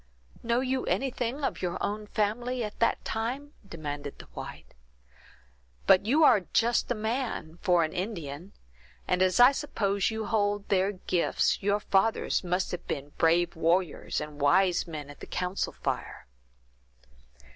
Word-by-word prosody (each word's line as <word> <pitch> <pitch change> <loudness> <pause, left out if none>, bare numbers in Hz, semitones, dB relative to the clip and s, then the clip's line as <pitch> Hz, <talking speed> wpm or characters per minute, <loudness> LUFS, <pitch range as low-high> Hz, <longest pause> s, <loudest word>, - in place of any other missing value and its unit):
"Know 235 +1 +1
you 260 0 -1
anything 260 +1 -1
of - - -2
your 175 -1 -2
own 210 +1 -3
family 240 +5 -1
at 210 -1 -6
that 230 - +1
time?" 260 +7 -3 0.2
demanded 145 -4 -6
the - - -11
white. - - -9 1.1
"But 190 +2 +5
you 300 +7 +4
are 245 -8 +7
just 235 +1 +2
a 245 - +1
man, 220 -7 -3
for 175 -4 +3
an 155 - -2
Indian; 180 -3 -5 0.6
and 180 0 +1
as 185 +2 +3
I 245 +2 +9
suppose 200 -9 0
you 220 -1 -3
hold 205 -1 0
their 195 0 +2
gifts, 180 -3 0
your 205 +1 +1
fathers 205 +1 +1
must 180 +1 -1
have 180 - -6
been 140 +1 -4
brave 170 +1 +3
warriors, 165 +1 0
and 150 -1 -7
wise 180 +6 +3
men 150 -3 -7
at 145 - -15
the - - -9
council 180 +1 -2
fire." - - -4
200 Hz, 150 wpm, -28 LUFS, 175-230 Hz, 1.1 s, I